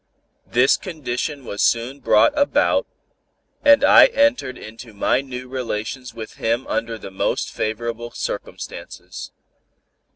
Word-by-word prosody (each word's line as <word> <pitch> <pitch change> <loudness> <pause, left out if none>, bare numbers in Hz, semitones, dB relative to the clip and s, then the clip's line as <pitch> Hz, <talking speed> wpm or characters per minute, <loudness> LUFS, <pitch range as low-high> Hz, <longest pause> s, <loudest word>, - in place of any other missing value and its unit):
This 125 +3 +4
condition 145 -4 -4
was 100 - -4
soon 120 +4 +1
brought 295 - +4
about, 285 -1 +2 0.8
and 285 -1 +6
I - - +8
entered 280 - +1
into 115 0 -11
my 125 +5 +2
new 130 -2 -7
relations 125 0 -4
with 115 -1 -9
him 115 +3 0
under 115 -1 -2
the 100 - -9
most 95 - -1
favorable 115 +2 -3
circumstances. - - -7
125 Hz, 120 wpm, -21 LUFS, 115-140 Hz, 0.8 s, I